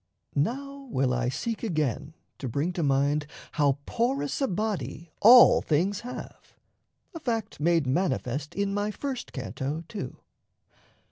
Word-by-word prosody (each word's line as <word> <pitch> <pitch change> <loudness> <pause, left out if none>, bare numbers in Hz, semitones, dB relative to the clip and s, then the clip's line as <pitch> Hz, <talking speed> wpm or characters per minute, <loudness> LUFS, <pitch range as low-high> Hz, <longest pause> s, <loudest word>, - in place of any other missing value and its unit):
Now 275 - -2
will 130 - +1
I 125 0 0
seek 225 - -3
again 155 - -1 0.2
to 130 - -4
bring 145 +9 -1
to 175 - -2
mind 145 +1 +2 0.2
How 145 -3 +2
porous 260 +4 -1
a 270 - +3
body 175 - -3
all 240 +3 +9
things 180 +6 +1
have 245 +1 -9 0.6
a 330 - -6
fact 225 -7 -3
Made 165 0 +3
manifest 140 -2 -1
in 200 0 0
my 205 +1 0
first 260 +3 -5
canto, 135 - -4
too. 210 0 -6
170 Hz, 135 wpm, -27 LUFS, 140-225 Hz, 0.6 s, all